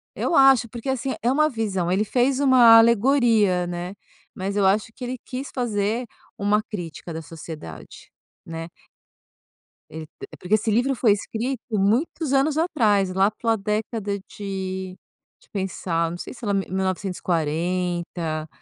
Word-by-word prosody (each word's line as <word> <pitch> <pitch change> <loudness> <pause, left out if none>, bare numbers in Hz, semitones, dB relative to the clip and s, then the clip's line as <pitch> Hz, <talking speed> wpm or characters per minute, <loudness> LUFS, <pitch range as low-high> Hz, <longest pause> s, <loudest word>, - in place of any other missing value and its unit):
Eu - - 0
acho, 270 -4 +6
porque, 235 +4 -6
assim, 265 0 -1
é 240 +2 +2
uma 305 +2 +3
visão, 200 - -2
ele 195 +3 +2
fez 255 +4 +1
uma 250 -5 +7
alegoria 225 -6 +3
né, 175 +2 -5 0.4
mas 195 +1 -3
eu 200 -2 +2
acho 210 +3 +2
que 255 - -10
ele 250 +1 -3
quis 260 +2 -6
fazer 225 -1 -1 0.3
uma 205 +1 +2
crítica 175 -4 -7
da 160 - -5
sociedade, 155 - -10 0.3
né. 165 0 -6 1.2
Ele 155 0 -8 0.3
porque 190 +4 +2
esse 215 +1 0
livro 250 +5 +2
foi 225 -3 +3
escrito 225 +5 -2
muitos 235 - +1
anos 280 +3 +2
atrás, 215 - +2
lá 195 +2 +3
pela 225 +1 0
década 210 0 -2
de 190 -2 -5 0.5
de - - -27
pensar, 175 -4 -2
não 175 - -6
sei - - -7
se 240 -2 -9
era 205 - 0
mi 195 -1 0
mil 190 +1 -1
novecentos 185 0 -2
e - - -25
quarenta, 170 -1 -1
205 Hz, 155 wpm, -23 LUFS, 180-240 Hz, 1.2 s, uma